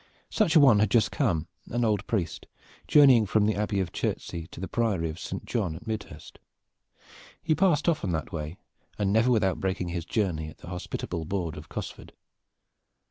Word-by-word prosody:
Such 205 -8 +2
a - - +9
one 130 -8 +6
had 105 -1 +3
just 110 0 +3
come, 90 - 0 0.2
an 120 0 0
old 105 -2 0
priest, 90 -8 -2 0.4
journeying 130 -7 +6
from 105 +1 +2
the 110 - +2
Abbey 105 -1 -1
of 90 -3 -2
Chertsey 85 -1 -3
to - - -11
the 95 - -4
Priory 100 -9 0
of 80 - -10
Saint - - -6
John 95 -9 -1
at 90 - -11
Midhurst. 105 -9 -7 1.0
He 155 - +2
passed 165 -1 +2
often 150 - +1
that 80 -2 -3
way, 80 +2 -5 0.4
and 100 -1 +1
never 110 +3 +4
without 105 -6 +2
breaking 95 -2 -2
his 85 -1 -3
journey 85 -7 -1
at 75 - -14
the 85 - -11
hospitable 90 -2 -4
board 85 -3 -3
of 75 0 -10
Cosford. - - -7
100 Hz, 185 wpm, -27 LUFS, 85-115 Hz, 1.0 s, a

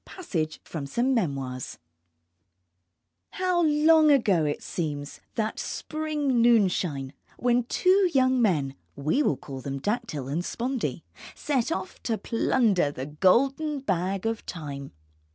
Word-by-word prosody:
PASSAGE 160 - -4
FROM 150 -4 -6
SOME 245 - +1
MEMOIRS 135 - -2 1.6
How 365 -2 +1
long 310 0 +5
ago 205 - +4
it 145 - -2
seems, 145 -4 -4 0.2
that 220 -1 -2
spring 300 -5 -1
noonshine 180 - +2 0.2
when 245 0 +2
two 370 +7 +3
young 260 -2 +3
men 150 - +1 0.2
(we 150 - +1
will 150 - +1
call 135 -2 -8
them 140 +1 -4
Dactyl 205 - -3
and 155 +6 -2
Spondee) 250 +5 -3 0.3
set 275 -1 -1
off 365 - -4
to 225 -2 -1
plunder 225 - +2
the 130 -2 -6
golden 270 - +2
bag 190 -3 -1
of 225 0 -1
Time. 140 -5 -6
220 Hz, 125 wpm, -26 LUFS, -, 1.6 s, long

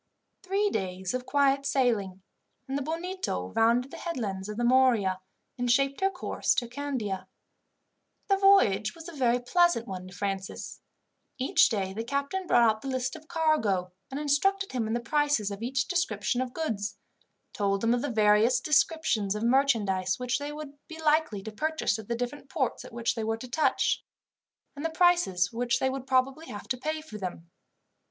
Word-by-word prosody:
Three 395 +2 0
days 185 +1 -3
of 255 0 -3
quiet 275 -1 +3
sailing, 215 -9 0 0.4
and 270 - -3
the 285 - -1
Bonito 325 - -3
rounded 235 +4 +3
the - - -8
headlands 210 - -4
of 210 - -5
the 240 - -1
Morea, 240 -7 +3 0.4
and 245 0 0
shaped 275 +4 +2
her 385 - +4
course 365 -2 -1
to 250 -4 0
Candia. 240 -7 -4 1.0
The 390 - +3
voyage 220 - +4
was 330 0 -10
a - - -7
very 245 -4 +2
pleasant 345 -1 +2
one 185 -2 -6
to 185 - -12
Francis. 195 0 -4 0.6
Each 265 +1 +4
day 195 -5 -2
the 225 +3 -3
captain 280 +9 -2
brought 235 -6 +5
out 220 0 +1
the - - -7
list 260 -1 -2
of 315 -1 -12
cargo, 225 - +1 0.2
and 270 - -4
instructed 390 +7 +1
him 240 -4 -1
in 220 - -2
the 240 - +1
prices 285 -5 +1
of 200 +1 -6
each 255 +2 -1
description 345 -8 0
of 255 -1 -3
goods, 225 -10 -3 0.6
told 200 -1 0
him 230 +1 +3
of 245 - 0
the 290 - -2
various 215 +1 +4
descriptions 275 - +1
of 210 - -3
merchandise 220 -8 +2
which 250 +1 -1
they 290 +1 -4
would 300 -1 -8
be 320 -1 -9
likely 305 -10 +1
to 220 - -6
purchase 310 -3 -1
at 215 - -9
the 235 - -1
different 245 +4 -5
ports 265 -3 -1
at - - -11
which 235 0 -1
they 225 - -4
were 225 0 -1
to 255 - -8
touch, 300 +6 +1 0.7
and 290 - -7
the 325 - 0
prices 320 - +3
which 240 +1 +1
they 265 - 0
would 265 0 -6
probably 270 +4 +1
have 205 - -8
to 255 - +1
pay 310 +3 -2
for 215 -9 -9
them. 175 -3 -6
250 Hz, 185 wpm, -28 LUFS, 210-295 Hz, 1.0 s, brought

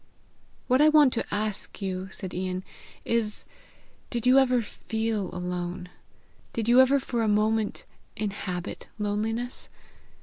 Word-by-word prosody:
"What 255 +2 +3
I 305 - +7
want 300 -4 +6
to 230 - -3
ask 210 -1 -2
you," 190 -1 -3
said 190 -1 -6
Ian, 185 0 -2 0.4
"is 225 -2 0 0.6
did 240 -2 -3
you 255 +2 +7
ever 250 -3 +3
feel 220 -2 -2
alone? 180 0 -4 0.6
Did 230 -1 -2
you 245 +2 +8
ever 270 +2 +4
for 240 -3 -2
a 225 - +1
moment 215 +1 +1 0.3
inhabit 195 -4 -4
loneliness? 220 +4 -2
215 Hz, 130 wpm, -27 LUFS, 190-240 Hz, 0.6 s, you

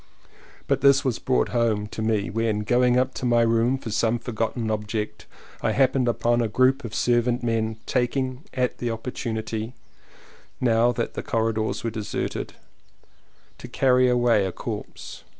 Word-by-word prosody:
But - - 0
this 140 0 +6
fact - - -17
was 125 -4 0
brought 130 - +1
home 115 -4 +1
to 110 - -7
me 110 -2 0
when, 110 -1 0
going 125 +3 +3
up 130 +1 +1
to - - -7
my 120 -1 +4
room 115 +3 +2
for 115 -4 -7
some 115 +2 +1
for 120 - -7
gotten 110 0 -2
object, 105 0 -4 0.3
I - - +1
happened 130 -1 +2
upon 120 0 +1
a 115 - +1
group 130 +5 +2
of 115 -3 -6
servant 120 0 +1
men 110 -1 -1
taking 130 +1 -1 0.4
the 120 - -2
opportunity, 115 0 -4 0.8
now 120 -1 +3
that 120 -1 -3
the - - -4
corridors 110 -1 -1
were 115 - -2
deserted, 110 -2 -4 1.1
to - - -8
carry 130 -1 +3
away 120 -4 +3
a - - -4
corpse. - - -7
115 Hz, 160 wpm, -24 LUFS, 110-125 Hz, 1.1 s, this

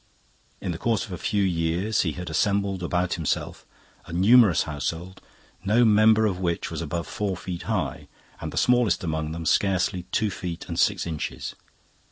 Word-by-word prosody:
In 90 - -2
the 80 - -5
course 115 0 0
of 105 - -12
a 90 - -4
few 100 -2 0
years 90 +4 0
he 80 -4 -1
had 90 +2 -7
assembled 100 +3 0
about 90 +1 0
himself 80 -3 -3 0.4
a - - -9
numerous 95 -1 +5
household, 85 +5 -5 0.4
no 110 +5 +4
member 110 0 +5
of 95 -4 -1
which 85 -2 -2
was - - -4
above 85 -1 -3
four 100 -3 -3
feet 90 -2 -6
high - - -2 0.3
and - - -5
the - - -7
smallest 125 -5 +3
among 80 -2 -2
them 85 0 -5
scarcely 90 0 +1
two 110 -2 +1
feet 90 -1 -6
and 85 -1 -4
six 100 -2 +2
inches. 80 -3 -4
90 Hz, 175 wpm, -25 LUFS, 85-105 Hz, 0.4 s, numerous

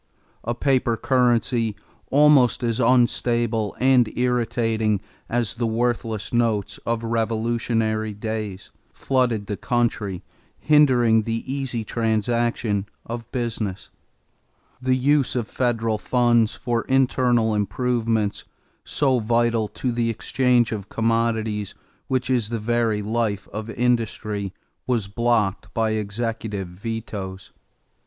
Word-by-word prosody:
A 120 +1 -2
paper 125 -3 +1
currency, 120 -3 +1 0.3
almost 140 -4 +5
as 115 0 0
unstable 120 -3 +2
and 125 -3 +4
irritating 115 -3 +1 0.3
as 120 -2 0
the 120 0 -1
worthless 115 -2 -1
notes 115 -4 0
of 115 0 0
revolutionary 115 -1 0
days, 105 -3 -5 0.2
flooded 125 -6 0
the 105 -1 -4
country, 115 -6 -1 0.3
hindering 125 -7 +4
the 115 +1 -3
easy 130 -4 -3
transaction 115 -2 0 0.2
of 115 0 -7
business. 110 -5 -3 0.9
The 130 0 +2
use 140 +1 +2
of 120 -3 -1
federal 115 -3 0
funds 120 -3 +2
for 120 -2 -1
internal 125 -4 +2
improvements, 110 0 0 0.4
so 135 -3 +1
vital 115 0 +1
to 125 +4 -3
the 120 -1 0
exchange 125 +1 +1
of 105 -2 -5
commodities 115 -2 0 0.3
which 130 -1 0
is 120 -5 +1
the 115 - -2
very 115 -1 0
life 110 -2 -1
of 110 +2 -5
industry, 110 -4 -1 0.4
was 120 -6 0
blocked 110 -2 0
by 110 -1 +1
executive 110 -2 -3
vetoes. 100 -1 -6
115 Hz, 110 wpm, -23 LUFS, 110-120 Hz, 0.9 s, almost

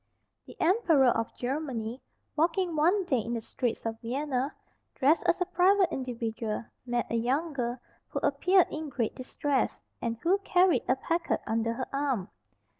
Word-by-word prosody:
The - - -12
emperor 325 - +4
of 230 - -1
Germany, 250 -3 -3 0.3
walking 335 +2 +1
one 355 +6 +3
day 265 -8 +1
in 230 +2 -3
the - - -1
streets 230 +1 -3
of 225 0 -3
Vienna, 265 +2 -1 0.4
dressed 295 +5 +4
as 345 - +3
a 360 - +1
private 370 0 +3
individual, 230 -4 -3 0.2
met 240 0 0
a - - 0
young 270 +8 0
girl 245 -2 -2 0.3
who - - -6
appeared 360 +6 +4
in 310 -1 -4
great 235 -5 -1
distress, 265 +1 -1 0.2
and 230 -1 -2
who 375 +4 +3
carried 370 -2 +3
a 255 - +4
packet 335 +5 -1
under 230 0 0
her 255 +2 -3
arm. 275 -9 -1
270 Hz, 160 wpm, -29 LUFS, 235-335 Hz, 0.4 s, emperor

